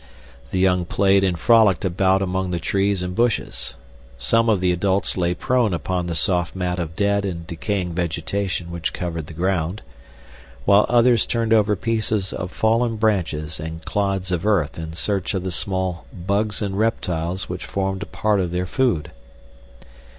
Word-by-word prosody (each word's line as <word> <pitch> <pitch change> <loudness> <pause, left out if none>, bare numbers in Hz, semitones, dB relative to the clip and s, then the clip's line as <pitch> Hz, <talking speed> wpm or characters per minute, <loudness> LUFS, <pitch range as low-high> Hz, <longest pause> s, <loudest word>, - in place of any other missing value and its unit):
The - - -2
young 90 -1 +3
played 95 +2 +3
and 90 -3 +1
frolicked 105 -1 +4
about 95 +1 +2
among 95 0 -1
the 90 - -1
trees 95 +2 0
and 90 0 -3
bushes. 115 +1 -1 0.4
Some 115 - +2
of 105 -4 +3
the 90 0 +2
adults 95 +2 +1
lay 90 -1 0
prone 120 -2 +1
upon 90 +1 -2
the 85 - -3
soft 90 -2 +1
mat 90 -1 -2
of 80 -2 -4
dead 100 +1 +1
and 85 -4 -4
decaying 90 +2 -3
vegetation 85 +1 -2
which 85 0 -3
covered 85 -4 -4
the 80 - -10
ground, 90 +1 -1 0.8
while 100 +1 +5
others 120 0 +4
turned 115 -1 +1
over 105 -1 +4
pieces 110 -2 -1
of 90 +1 -4
fallen 115 +1 +1
branches 85 -8 -1
and 80 +1 -7
clods 95 -2 -1
of 90 -1 -1
earth 90 -8 +1
in 80 0 -6
search 100 +3 -1
of 95 - -2
the 95 - -3
small 95 0 -2
bugs 100 +4 -1
and 100 -1 -2
reptiles 90 -5 -1
which 90 0 -6
formed 95 0 -2
a - - -5
part 105 -2 0
of 90 -2 0
their 90 +1 -1
food. 90 - 0
95 Hz, 170 wpm, -22 LUFS, 85-105 Hz, 0.8 s, while